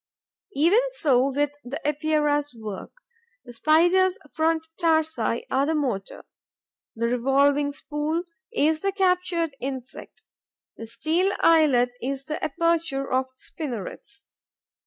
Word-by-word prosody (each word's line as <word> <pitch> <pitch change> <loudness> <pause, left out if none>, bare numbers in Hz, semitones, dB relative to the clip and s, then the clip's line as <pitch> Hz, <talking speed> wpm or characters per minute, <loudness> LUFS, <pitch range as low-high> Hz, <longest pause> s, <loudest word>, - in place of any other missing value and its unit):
Even 335 +10 +4
so 275 - +2
with 285 +1 0
the 270 +5 -5
Epeira's 295 -2 0
work. 215 -4 -7 0.5
The 240 - -10
Spider's 350 +8 +3
front 320 0 0
tarsi 315 - +1
are 270 +2 +2
the 320 - +1
motor; 245 -10 -3 0.7
the 230 +1 0
revolving 280 +4 +2
spool 300 +3 -3 0.3
is 315 -8 +2
the 395 - 0
captured 360 -5 0
insect; 260 -1 -7 0.5
the 225 - -9
steel 330 - 0
eyelet 280 -7 +4
is 270 +1 -3
the 310 +3 -5
aperture 320 -3 0
of 260 +1 +2
the 260 0 -31
spinnerets. 270 - -7
295 Hz, 115 wpm, -25 LUFS, 260-325 Hz, 0.7 s, Even